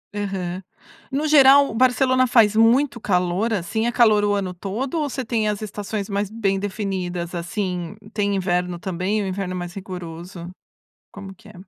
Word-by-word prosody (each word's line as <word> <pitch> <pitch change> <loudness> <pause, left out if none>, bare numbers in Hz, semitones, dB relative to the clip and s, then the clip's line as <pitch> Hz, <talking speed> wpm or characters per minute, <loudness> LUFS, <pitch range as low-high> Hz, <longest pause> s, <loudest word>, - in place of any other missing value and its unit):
Aham. 190 -2 -4 0.5
No 290 +3 -1
geral, 280 -3 +6
Barcelona 255 +1 +3
faz 220 -3 +4
muito 235 +3 +3
calor, 180 +3 0
assim, 215 +4 -1
é - - +1
calor 215 -4 +4
o 205 - +2
ano 190 -3 -2
todo 230 - -3
ou 295 -2 -1
você 260 -1 -4
tem 220 -2 0
as 210 0 -3
estações 205 -1 -4
mais 200 -1 -2
bem 200 -3 -1
definidas, 185 -4 -4
assim, 180 +1 -3 0.2
tem 205 -2 0
inverno 180 -2 -1
também, 190 +4 -2
o 195 - -3
inverno 190 -1 -3
é - - -4
mais 175 0 -6
rigoroso, 175 -2 -8 0.6
como 195 -1 -9
que 220 +2 -19
é? 210 - -13
200 Hz, 170 wpm, -22 LUFS, 180-225 Hz, 0.6 s, geral